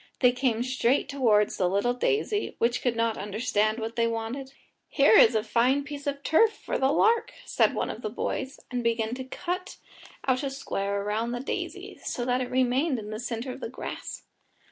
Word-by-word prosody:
They 250 -2 +6
came 245 -2 0
straight 255 +1 +1
towards 225 -7 +2
the 180 -2 +2
little 200 +6 +1
daisy, 415 - 0
which 235 +1 +1
could 245 -2 0
not 230 -1 0
understand 215 +1 0
what 225 0 -4
they 230 -1 +2
wanted. 230 +4 -4 0.4
"Here 275 -6 +4
is 225 - +7
a 215 - +2
fine 250 +5 +2
piece 290 0 -7
of 280 0 -2
turf 435 +8 +4
for - - -4
the 265 +1 +3
lark," 460 +7 +3
said - - +2
one - - -1
of - - -9
the - - -3
boys, 265 - -3
and 245 -1 -2
began 230 -1 0
to 260 +1 -4
cut 360 +8 -5 0.5
out 255 -1 +2
a 280 - -2
square 200 -7 -3
round 220 +4 -1
the - - -3
daisy, 265 - -5
so 240 - -3
that 250 0 +1
it 250 - -3
remained 260 +3 +2
in 210 -1 -6
the 215 - -4
centre 240 +1 -4
of 255 - -8
the - - -5
grass. 255 - -7
245 Hz, 200 wpm, -27 LUFS, 225-270 Hz, 0.5 s, is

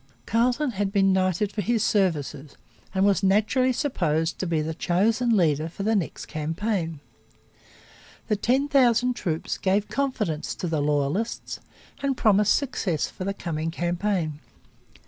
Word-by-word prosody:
Carleton 245 +5 +1
had 200 -2 -2
been 195 -2 +3
knighted 185 +2 +1
for 210 - -2
his 225 +2 +1
services 155 -9 -1 0.3
and 190 0 +2
was 200 -2 +3
naturally 215 +7 +3
supposed 170 - -1
to 185 - -2
be 165 -2 0
the 155 +1 -2
chosen 220 +8 +1
leader 155 -3 +2
for 195 - -6
the 220 +2 +2
next 190 -5 -2
campaign. 165 +1 -3 1.3
The 215 - +2
ten 255 +7 +1
thousand 250 -3 +3
troops 165 -8 -3
gave 200 +2 +1
confidence 215 - -2
to 180 - -4
the 160 -3 0
loyalists 145 +9 -1 0.4
and 275 -2 0
promised 210 -1 +4
success 200 - -1
for 185 - -6
the 195 - -1
coming 165 -3 -3
campaign. 175 -2 -1
195 Hz, 145 wpm, -25 LUFS, 165-225 Hz, 1.3 s, promised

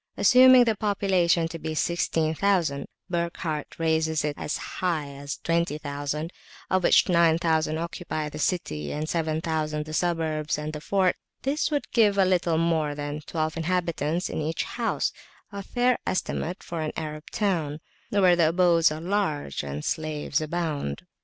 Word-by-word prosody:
Assuming 255 0 +7
the 225 -2 +1
population 190 -5 +2
to 165 - -7
be 155 0 -4
16,000 165 -1 +1 0.2
(Burckhardt 170 -3 -3
raises 160 -1 +1
it 150 - -1
as 150 - -3
high 165 -6 -2
as 140 +1 -6
20,000), 150 -1 -2 0.4
of 185 - +3
which - - +5
9000 165 -2 +3
occupy 165 -2 -4
the 150 0 -7
city, 75 - -1
and 155 +1 -3
7000 155 -2 -1
the 155 - -8
suburbs 160 -2 0
and 150 +1 -4
the 150 - -6
fort, 190 +2 +1 0.3
this 285 +4 0
would 290 -2 -2
give 210 -4 +4
a 195 - +5
little 175 -3 +2
more 160 -3 +1
than 145 +1 -4
twelve 155 -1 -2
inhabitants 170 -1 -1
to - - -4
each 155 +1 -1
house, - - -1 0.4
a 200 -1 -5
fair 245 +5 +1
estimate 185 0 -2
for 170 -2 -4
an 155 - -2
Arab 155 -1 -5
town, 165 -8 -1 0.3
where 185 -3 +4
the 165 -2 +4
abodes 170 -2 +4
are 155 +1 -5
large 170 - -1
and 70 +1 -5
slaves 155 -1 -1
abound. 155 - -3
160 Hz, 150 wpm, -26 LUFS, 155-180 Hz, 0.4 s, Assuming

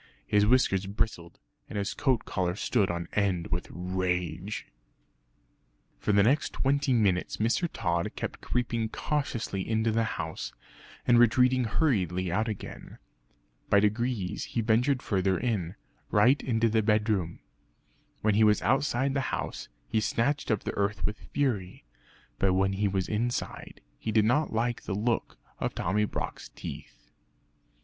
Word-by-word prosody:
His 105 0 +3
whiskers 100 -6 +3
bristled 95 -4 -3 0.3
and 105 - -5
his 100 -1 -1
coat 130 -5 +1
collar 90 -1 -1
stood 105 -1 +1
on 85 -1 -3
end 95 -5 0
with 85 +1 -2
rage. 90 +2 -2 1.3
For - - 0
the 100 -1 +5
next 140 +8 +2
twenty 140 +1 +1
minutes 100 -7 +2
Mr. 120 +11 +1
Tod 85 -4 -1
kept - - -5
creeping 115 -2 -1
cautiously 120 -8 -2
into 110 0 +2
the 115 +1 +1
house, 80 0 -4 0.5
and 120 -1 +5
retreating 125 +2 +4
hurriedly 95 - +1
out 110 +5 +1
again. 110 -3 -7 0.7
By 100 - +6
degrees 105 -2 0
he 115 - -2
ventured 120 +4 +2
further 95 -2 +1
in 100 -7 -1 0.3
right 120 +7 +4
into 115 -2 +1
the 110 0 +2
bedroom. 105 -5 +1 0.8
When 110 0 +3
he 110 +2 +4
was 105 -1 +5
outside 135 +1 +1
the 140 - +1
house, - - -4 0.2
he 110 -1 +1
scratched 140 +7 0
up 110 -3 +1
the - - -3
earth 100 +1 0
with 105 0 -5
fury. 105 - -1 0.5
But 95 -1 +3
when 95 +1 +2
he 100 +1 +1
was 95 -2 -1
inside 120 +3 -3 0.2
he 110 - -3
did 110 -1 +4
not 145 +8 +2
like 120 +1 0
the 95 - -4
look 115 +3 -1 0.2
of - - -2
Tommy 105 +4 +1
Brock's - - -5
teeth. - - -10
105 Hz, 145 wpm, -28 LUFS, 95-120 Hz, 1.3 s, By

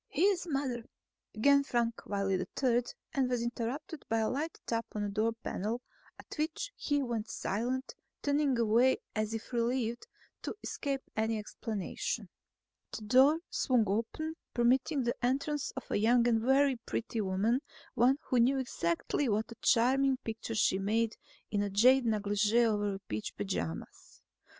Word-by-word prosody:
"His 380 -2 +2
mother," 270 -5 -1 0.5
began 280 +6 +4
Frank 235 -3 -1
Wiley 195 -2 0 0.2
III 245 -1 +4 0.3
and 270 -3 +1
was 245 -2 0
interrupted 245 +6 -4
by 225 - +2
a 220 -1 +1
light 305 +5 -3
tap 230 0 -1
on 210 - -2
the 205 - -1
door 215 +3 +1
panel, 215 +5 -2 0.4
at - - -10
which 315 +11 -2
he 290 -1 0
went 230 -3 -3
silent, 250 +6 -2 0.3
turning 285 -2 +2
away 235 +3 +4 0.2
as 215 +1 -1
if 225 +3 -7
relieved 235 - -1 0.3
to - - -4
escape 275 -1 -3
any 220 0 0
explanation. 210 -1 -4 0.6
The 220 - -6
door 265 +8 +5
swung 250 -3 +2
open, 230 +10 -2 0.2
permitting 260 +4 +2
the 240 0 -2
entrance 280 +3 0
of 265 - -7
a - - +2
young 235 +2 +4
and 225 -2 +3
very 265 +2 +3
pretty 230 -1 -3
woman, 205 +6 +1 0.3
one 255 +4 +4
who 250 - +1
knew 255 +4 +4
exactly 245 - -1
what 215 +2 0
a - - -8
charming 265 +3 +3
picture 225 0 -4
she 195 -3 +3
made 220 +3 +1 0.4
in 205 -1 0
jade 250 +3 +6
negligee 210 +2 +2
over 205 -3 0
peach 105 0 -4
pajamas. 190 - -5
235 Hz, 150 wpm, -32 LUFS, 215-265 Hz, 0.6 s, jade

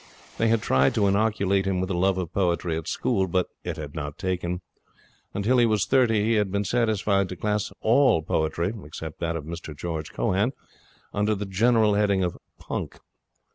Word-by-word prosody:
They 115 - +3
had 115 -1 +2
tried 65 +1 +3
to 105 - +3
inoculate 100 -1 +2
him 95 -2 0
with 95 +1 -2
a - - 0
love 95 +2 +2
of 90 -3 -4
poetry 85 -3 0
at 80 -1 -5
school, 95 -1 0
but 90 0 0
it - - -4
had 75 -2 -7
not 75 -1 -5
taken. 90 -1 -2 0.7
Until 115 +6 +2
he 120 - +5
was 105 -5 +2
thirty 115 -2 +3
he 115 +2 +2
had 105 -3 +1
been 100 +1 0
satisfied 100 -3 +1
to 90 - -5
class 105 +3 -1
all 120 - +4
poetry 85 +5 0
(except 75 +1 -8
that 85 -1 -1
of 80 - -4
Mr 80 -1 -7
George 80 -2 -4
Cohan) 100 - 0 0.6
under 105 +1 +1
the 100 +1 -4
general 110 +2 +3
heading 100 -2 +2
of 90 - -1 0.2
punk. - - -5
95 Hz, 185 wpm, -25 LUFS, 85-105 Hz, 0.7 s, he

